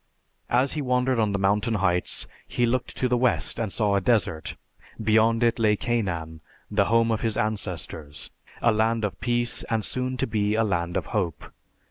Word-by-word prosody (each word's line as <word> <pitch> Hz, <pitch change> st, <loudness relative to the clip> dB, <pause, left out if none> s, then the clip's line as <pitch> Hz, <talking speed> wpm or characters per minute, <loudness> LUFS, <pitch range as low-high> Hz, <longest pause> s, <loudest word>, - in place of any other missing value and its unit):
As 130 Hz, +3 st, +2 dB
he 150 Hz, -, -2 dB
wandered 125 Hz, -1 st, +1 dB
on 105 Hz, -2 st, +2 dB
the 100 Hz, -, 0 dB
mountain 100 Hz, +3 st, +1 dB
heights, 90 Hz, -3 st, +1 dB, 0.2 s
he 120 Hz, -, +1 dB
looked 125 Hz, +2 st, -1 dB
to 130 Hz, -, +1 dB
the 125 Hz, -1 st, +1 dB
west 125 Hz, -1 st, +1 dB
and 110 Hz, -4 st, -2 dB
saw 105 Hz, -1 st, +1 dB
a 100 Hz, -, +2 dB
desert; 95 Hz, -8 st, 0 dB, 0.4 s
beyond 110 Hz, +1 st, +3 dB
it 115 Hz, 0 st, +2 dB
lay 105 Hz, -2 st, +4 dB
Canaan, 95 Hz, -10 st, -2 dB, 0.3 s
the 100 Hz, -1 st, +3 dB
home 115 Hz, +1 st, +3 dB
of 110 Hz, -, 0 dB
his 110 Hz, -2 st, -1 dB
ancestors, 85 Hz, -8 st, -3 dB, 0.3 s
a 115 Hz, -, +5 dB
land 110 Hz, 0 st, +1 dB
of 100 Hz, -, -5 dB
peace 120 Hz, 0 st, +1 dB
and 110 Hz, -2 st, 0 dB
soon 130 Hz, 0 st, -1 dB
to -, -, 0 dB
be 105 Hz, -1 st, 0 dB
a 115 Hz, -, +3 dB
land 85 Hz, -4 st, -1 dB
of -, -, -2 dB
hope. 90 Hz, -8 st, -2 dB
110 Hz, 185 wpm, -25 LUFS, 100-120 Hz, 0.4 s, a